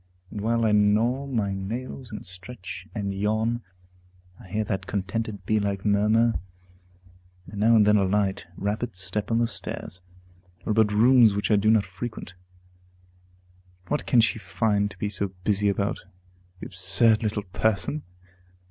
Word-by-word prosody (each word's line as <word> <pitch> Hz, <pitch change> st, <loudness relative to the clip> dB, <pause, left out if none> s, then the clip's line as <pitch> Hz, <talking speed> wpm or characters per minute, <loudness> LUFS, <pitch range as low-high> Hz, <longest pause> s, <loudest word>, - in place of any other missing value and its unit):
And 105 Hz, -, -5 dB
while 115 Hz, +1 st, +1 dB
I 110 Hz, -, +3 dB
gnaw 110 Hz, +6 st, +2 dB
my 110 Hz, -7 st, -1 dB
nails, 115 Hz, +5 st, -5 dB
and 105 Hz, -, -7 dB
stretch, 95 Hz, +1 st, -8 dB
and 100 Hz, -2 st, -2 dB
yawn, 110 Hz, +4 st, 0 dB, 0.8 s
I -, -, -13 dB
hear 105 Hz, +4 st, -1 dB
that 95 Hz, -3 st, -3 dB
contented, 100 Hz, 0 st, -3 dB
bee 110 Hz, +2 st, +2 dB
like 100 Hz, -1 st, -2 dB
murmur, 105 Hz, +3 st, +3 dB, 1.1 s
and 100 Hz, -, -8 dB
now 115 Hz, +2 st, +5 dB
and 105 Hz, -2 st, +6 dB
then 105 Hz, 0 st, +5 dB
a 100 Hz, -, +3 dB
light, 95 Hz, -1 st, 0 dB
rapid 105 Hz, +2 st, -2 dB
step 100 Hz, +3 st, -3 dB
on 115 Hz, -, +2 dB
the 120 Hz, -, +3 dB
stairs, 90 Hz, -5 st, -6 dB, 0.6 s
or -, -, -1 dB
about 110 Hz, -1 st, +3 dB
rooms 115 Hz, 0 st, +5 dB
which 100 Hz, +2 st, -1 dB
I -, -, +6 dB
do 105 Hz, +1 st, +2 dB
not 110 Hz, -2 st, +4 dB
frequent. 95 Hz, 0 st, -7 dB, 1.6 s
What 85 Hz, -, -1 dB
can 115 Hz, +4 st, +5 dB
she 115 Hz, +1 st, +1 dB
find 100 Hz, +2 st, 0 dB
to -, -, -14 dB
be 105 Hz, -, -2 dB
so 100 Hz, -1 st, -2 dB
busy 105 Hz, 0 st, +2 dB
about, 100 Hz, 0 st, -1 dB, 0.6 s
the -, -, -7 dB
absurd 105 Hz, +5 st, +2 dB
little 105 Hz, -2 st, -1 dB
person? 110 Hz, +9 st, -1 dB
105 Hz, 155 wpm, -25 LUFS, 100-115 Hz, 1.6 s, and